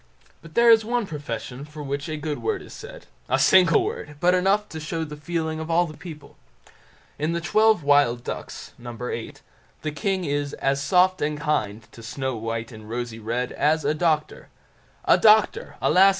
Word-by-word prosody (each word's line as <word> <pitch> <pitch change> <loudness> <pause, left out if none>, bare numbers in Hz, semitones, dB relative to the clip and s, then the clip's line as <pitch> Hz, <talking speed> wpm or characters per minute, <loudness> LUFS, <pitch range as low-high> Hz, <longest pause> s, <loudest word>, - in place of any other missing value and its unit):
But 165 -1 -15
there 235 0 +6
is 225 -1 +6
one 240 0 -1
profession 135 - -6
for 150 0 -9
which 140 +3 -4
a 155 - -3
good 150 0 -4
word 420 -3 -2
is - - -12
said, - - -10 0.2
a - - +3
single 180 -4 +5
word, 150 0 -5
but 180 +3 +4
enough 195 +3 +2
to 160 - -7
show 160 +1 -3
the 150 -1 -7
feeling 160 +1 -3
of 160 - -5
the 165 -1 +1
people. 155 -4 -11 0.8
In 155 +3 0
the 170 - -1
"Twelve 215 +1 +3
Wild 140 -4 +3
Ducks" - - -7
No. 120 0 -8
viii, 115 -1 -5 0.5
the 155 - -2
king 185 +4 -1
is 145 -1 -2
"as 140 0 0
soft 185 +4 +3
and 150 0 -1
kind" 115 -8 -1
to 115 - -13
Snow 130 +3 -3
white 115 +1 -4
and 110 -1 -12
Rosy 120 -1 -4
red 120 +3 -2
"as 155 0 +1
a 150 - +2
doctor"—a 155 -1 -1
doctor, 215 -1 +4
alas! 190 +2 +6
150 Hz, 180 wpm, -24 LUFS, 135-180 Hz, 0.8 s, there